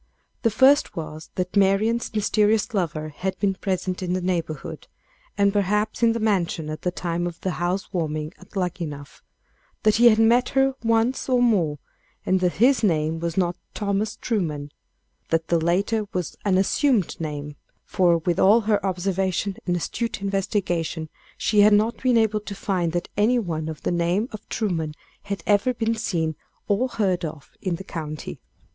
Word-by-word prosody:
The 230 - +3
first 265 +6 +4
was, 155 -1 -7
that 180 +1 -3
Marian's 205 +4 +2
mysterious 215 0 +2
lover 155 -6 -1
had 185 +5 -4
been 200 -2 +1
present 185 -1 -2
in 180 -1 -1
the 185 - 0
neighborhood, 165 -3 -3 0.5
and 200 0 +3
perhaps, 210 +2 0
in 230 -1 +4
the 230 - -2
mansion 175 -7 0
at 155 - -6
the 180 - 0
time 175 -1 -2
of 170 -1 -7
the 185 - -1
house 185 +3 -2
warming 155 -2 -2
at 190 +3 -17
Luckenough 165 -6 -4 0.6
that 215 -1 +4
he 240 +1 +8
had 215 - +4
met 235 +3 +4
her 270 0 +4
once 230 +4 +1
or 250 -1 +3
more, 190 -12 +2 0.5
and 185 0 +2
that 180 -1 +1
his 255 +6 +4
name 160 -5 +1
was 170 +1 -3
not 175 -2 +1 0.2
Thomas 205 +1 -1
Truman 155 - -2 0.6
that 165 0 0
the 170 -2 +2
latter 200 +5 +1
was 180 -4 -3
an 195 -3 +2
assumed 205 - +1
name, 150 -2 -5 0.3
for, 175 -3 +3
with 170 +1 -1
all 215 +5 +6
her 210 -2 +1
observation 190 +1 -1
and 175 - +2
astute 230 +7 -3
investigation, 185 -5 -1 0.3
she 210 - +1
had 210 +1 +7
not 215 +3 +2
been 250 -2 +3
able 220 -1 +2
to 205 -1 -7
find 180 -4 -1
that 175 - -2
any 230 +4 +3
one 160 -8 -2
of 155 - -8
the - - 0
name 175 +7 0
of 215 - -10
Truman 165 -8 -2 0.3
had 200 -4 -5
ever 210 +5 +2
been 225 0 0
seen 165 -7 -1 0.3
or 210 +6 +2
heard 195 -7 0
of 155 -3 -6
in 185 -3 -1
the 190 - -8
county. 155 -4 -6
190 Hz, 175 wpm, -24 LUFS, 170-215 Hz, 0.6 s, he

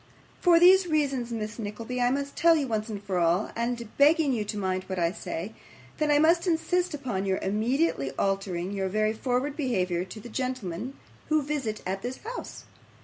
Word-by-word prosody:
For 345 -2 +6
these 370 +1 +7
reasons, 275 -6 0
Miss 220 0 -4
Nickleby, 225 +4 -4
I 245 - +4
must 280 +2 -2
tell 335 -1 +5
you 290 -4 0
once 220 -1 -2 0.2
for 190 -3 0
all, 175 +4 +2
and 235 0 -2
begging 300 -1 +5
you 220 -3 0
to 210 +1 -4
mind 185 -1 -1
what 190 - -4
I 170 -1 +2
say, 185 +1 -5 0.5
that 305 -1 +1
I 295 - +5
must 335 +4 +4
insist 350 0 +1
upon 240 -9 -3
your 190 0 +1
immediately 215 - +1
altering 195 -2 -1
your 195 -1 -2
very 215 +2 +1
forward 255 +5 -1
behaviour 185 - 0
to 190 +4 -9
the 215 - -10
gentlemen 250 -2 -4 0.3
who 310 -1 +3
visit 270 -7 -3
at 190 +1 -2
this 250 +3 -4
house. 475 +3 -7
235 Hz, 185 wpm, -27 LUFS, 195-290 Hz, 0.5 s, these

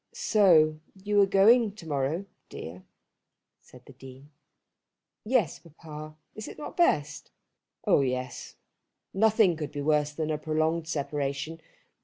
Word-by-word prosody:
"So 160 -8 +4 0.2
you're 205 -1 +3
going 210 +3 +4
to 170 -6 -12
morrow, 145 +5 -2 0.2
dear," 85 +3 -9 0.8
said 125 -1 -18
the 135 - -14
Dean. 135 +2 -14 0.9
"Yes, 220 - 0
papa. 155 -1 -11 0.2
Is 215 - -8
it - - -10
not 300 - -8
best?" 150 - +1 0.6
"Oh - - +4
yes. 130 -1 -4 0.6
Nothing 215 -3 +3
could 155 -2 -5
be 145 -1 -5
worse 150 0 +1
than 155 +1 -3
a 150 - -2
prolonged 160 +1 -1
separation. 145 +1 -3
155 Hz, 125 wpm, -27 LUFS, 145-195 Hz, 0.9 s, So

